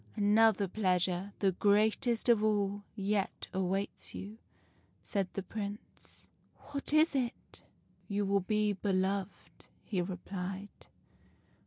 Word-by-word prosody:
" - - -26
' - - -27
Another 210 -1 +4
pleasure, 185 -1 0
the 195 -2 +2
greatest 215 +5 +2
of 230 -3 +5
all, 205 -1 +1
yet 200 -1 -1
awaits 190 +1 -2
you,' 210 +3 -7 0.6
said 195 -2 -1
the 195 - -3
Prince. 205 +1 -8
" - - -38
' - - -35
What 280 0 -3
is 310 +1 +5
it? 255 -3 -3
' - - -37
" - - -36
' - - -35
You 205 -1 0
will 200 0 +3
be 210 +2 +1
beloved,' 195 0 -2 0.2
he 190 -4 -1
replied. 190 +2 -6
200 Hz, 145 wpm, -32 LUFS, 190-215 Hz, 0.6 s, of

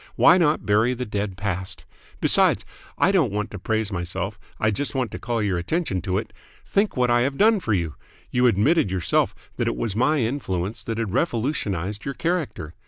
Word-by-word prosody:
Why 180 - +6
not 155 -3 +2
bury 110 +4 +3
the 125 +1 -4
dead 100 -3 -3
past? 95 -3 -3 0.4
Besides - - +4 0.3
I - - +4
don't 165 - +2
want 105 +1 -3
to 105 - -7
praise 110 +1 -1
myself, 95 +3 -3 0.2
I 110 - +2
just 145 +7 -1
want 130 -4 -1
to - - -6
call 115 -2 -2
your 95 -4 0
attention 100 - -1
to 90 +1 -1
it - - -4 0.3
think 200 -6 0
what 125 -1 +2
I 120 0 +4
have 135 +2 -1
done 220 0 +5
for 110 - -1
you. 85 -4 -2 0.4
You 125 0 +3
admitted 120 - +3
yourself 95 -2 +1 0.2
that - - 0
it - - 0
was 100 - -2
my 150 +7 +2
influence 110 -6 -2
that 115 -1 -3
had 115 -4 -2
revolutionised 110 - -1
your 140 - -4
character. 165 - -2
110 Hz, 195 wpm, -24 LUFS, 95-135 Hz, 0.4 s, Why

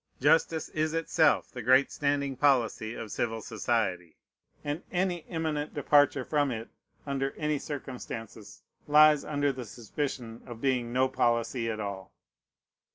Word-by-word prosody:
Justice 160 +3 +3
is 155 +1 -1
itself 165 -1 +2
the 125 - -6
great 130 +4 +4
standing 140 -1 -1
policy 120 -5 +1
of 110 -3 -7
civil 115 -1 -2
society; 105 -6 -2 0.5
and 145 +3 -3
any 180 -2 0
eminent 155 -3 -2
departure 145 -2 +3
from 145 -2 +1
it, 115 -2 -5 0.4
under 135 -1 -2
any 150 -1 0
circumstances, 120 -7 -7 0.2
lies 150 0 +6
under 145 -1 0
the 130 -1 -6
suspicion 120 +1 -5
of 120 -2 -8
being 125 -2 0
no 130 +2 +3
policy 115 -1 0
at 110 -1 -3
all. 100 -2 -5
135 Hz, 135 wpm, -29 LUFS, 115-150 Hz, 0.5 s, lies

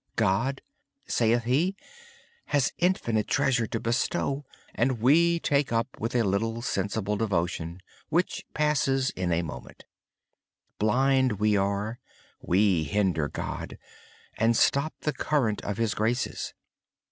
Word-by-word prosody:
God, 115 +6 +1 0.4
says 120 0 +2
he, 150 +11 +1 0.7
has 145 -3 +1
infinite 120 - +1
treasure 130 -5 +2
to 115 - -3
bestow, 135 +4 -1 0.3
and 120 0 0
we 170 +8 +4
take 145 -3 +1
so 115 0 +1 0.2
little 115 0 0
through 100 - 0
routine 105 -1 -2
devotion 85 -4 -1 0.3
which 170 +3 0
lasts 135 -3 +2
but - - -6
a 85 0 +1
moment. 80 - -9 0.9
Blind 130 +3 +3
as - - -6
we 105 +1 +2
are, 100 +3 -1 0.4
we 95 -3 +2
hinder 90 -2 +1
God, - - -5 0.6
and 115 +1 +3
stop 140 +3 +2
the 150 - -1
current 125 -9 0
of 105 -1 -3
His 115 -2 0
graces. 115 +3 -2
115 Hz, 125 wpm, -27 LUFS, 105-135 Hz, 0.9 s, we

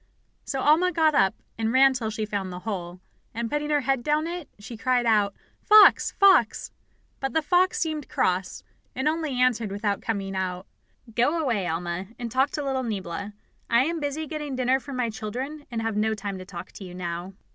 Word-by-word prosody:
So 270 -2 -2
Alma 320 +6 +4
got 320 -2 +3
up, 195 -9 +3 0.2
and 225 0 0
ran 265 +1 +6
till 235 -4 -2
she 215 0 -3
found 200 -3 -3
the 180 0 -7
hole, 180 -4 -5 0.4
and 230 0 -3
putting 295 0 -1
her 295 -1 +2
head 270 -1 0
down 300 +4 +1
it, 345 -2 -5
she 215 +3 -9
cried 245 +2 +1
out: 210 -3 +3 0.3
"Fox! 425 -1 +7
Fox!" 385 - +4 0.5
But 270 0 -3
the 320 -1 +1
fox 360 +3 +2
seemed 310 -3 -2
cross, 185 0 -1 0.3
and 265 +3 -1
only 310 -5 -1
answered, 235 -4 +2
without 205 0 -1
coming 195 -3 -3
out, 185 0 -3 0.5
"Go 270 +9 +2
away, 230 - 0
Alma, 175 +2 -3
and 235 -2 -5
talk 265 +3 +2
to 295 -4 -3
little 265 -1 0
Niebla. 205 -3 -4 0.4
I 235 +2 +4
am 335 +1 -2
busy 295 +1 -3
getting 300 -2 -5
dinner 255 +1 +2
for 280 - -10
my 250 -3 -1
children, 260 +8 -6
and 230 -2 -3
have 225 -1 -1
no 220 +1 +1
time 200 -2 -5
to 185 - -8
talk 180 -1 -9
to - - -10
you 180 -1 -9
now." 175 +1 -5
240 Hz, 200 wpm, -25 LUFS, 200-295 Hz, 0.5 s, Fox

